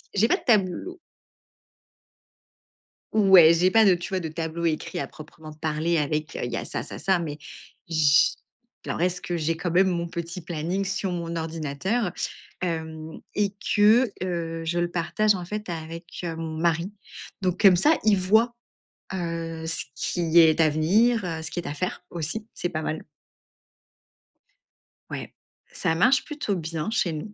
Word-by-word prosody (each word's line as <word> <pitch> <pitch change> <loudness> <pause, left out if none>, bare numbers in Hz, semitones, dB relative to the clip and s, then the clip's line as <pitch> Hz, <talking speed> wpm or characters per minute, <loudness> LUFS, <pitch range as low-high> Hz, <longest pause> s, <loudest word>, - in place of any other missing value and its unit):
j'ai 210 +3 +4
pas - - +3
de - - -15
tableau. 215 - +1 2.1
Ouais, 190 -6 +7
j'ai 180 +3 +3
pas 225 +1 +6
de 190 -3 +6
tu 175 +3 -6
vois? 190 -2 -1
De 165 - -4
tableau 160 +1 -4
écrit 155 -2 -1
à 140 - -3
proprement 155 +1 -12
parler 155 +2 -1
avec 150 0 -1
il 120 - -3
y - - -2
a - - -4
ça - - -4
ça - - -8
ça, 190 -2 +2
mais 150 -3 -4 0.5
j 155 -4 +4 0.5
alors, - - -3
est-ce 180 0 +1
que 175 - -3
j'ai 165 0 -1
quand 175 +1 -2
même 185 +3 +4
mon 170 -1 -1
petit 170 +1 -5
planning 175 +3 -3
sur 190 0 -2
mon 170 -1 -4
ordinateur, 165 +6 -2 0.5
hem, 160 -2 -4 0.2
et 205 -1 +1 0.2
que, 215 +2 +5
heu, 165 -2 -3
je 170 +2 0
le 175 0 0
partage 195 +5 +1
en 180 - -5
fait 210 +4 -5
avec, 165 0 -6 0.2
heu, 165 -2 -3
mon 160 -1 -5
mari, 170 +3 0 0.5
donc 180 -2 0
comme 195 -4 +7
ça, 300 - +4
il 210 -2 +5
voit, 220 +6 +3 0.6
heu, 165 -2 -4
ce 165 - -2
qui 170 -1 +2
est 160 -1 +6
à 155 - +5
venir, 200 +9 +3
heu, 165 -2 -3
ce 160 - -6
qui - - -3
est 175 - -5
à - - -3
faire 180 +4 -4
aussi, 175 +7 -4
c'est 175 - -3
pas 155 -3 -3
mal. 155 0 -3 2.1
Ouais, - - -6 0.4
ça 160 - 0
marche 250 +10 +4
plutôt 295 -10 -2
bien, 165 0 -3
chez 180 -7 +1
nous. 155 +7 -6
170 Hz, 170 wpm, -25 LUFS, 160-190 Hz, 2.1 s, Ouais